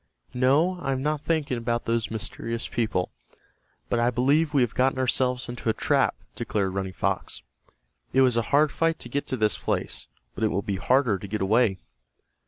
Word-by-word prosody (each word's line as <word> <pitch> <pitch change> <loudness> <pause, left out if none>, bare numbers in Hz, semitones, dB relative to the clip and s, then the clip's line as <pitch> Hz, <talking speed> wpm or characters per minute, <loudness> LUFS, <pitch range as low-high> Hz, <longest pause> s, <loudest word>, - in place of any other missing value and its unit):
"No, 145 +9 +3
I 135 -5 -1
am 130 0 -3
not 150 0 0
thinking 150 -7 0
about 120 0 -1
those 115 -1 0
mysterious 115 +1 -4
people, 110 -6 -1 0.8
but 120 - 0
I 120 +1 +3
believe 140 +6 +2
we 140 -4 +4
have 120 - -2
got 130 +1 +2
ourselves 125 0 +1
into 120 -1 -3
a - - +3
trap," - - +2 0.2
declared 95 -3 -1
Running 95 -1 -2
Fox. 90 - -2 0.7
"It 135 - +4
was 125 -3 +4
a 115 - +3
hard 145 +1 +4
fight 165 0 +1
to 120 - -7
get 140 +4 -2
to 130 - -2
this 110 -2 +1
place, - - -2 0.3
but - - -4
it - - +5
will 100 -1 -1
be 100 -2 -2
harder 125 -2 +2
to 100 - -7
get 105 +2 -3
away." 105 0 +3
125 Hz, 190 wpm, -26 LUFS, 110-135 Hz, 0.8 s, it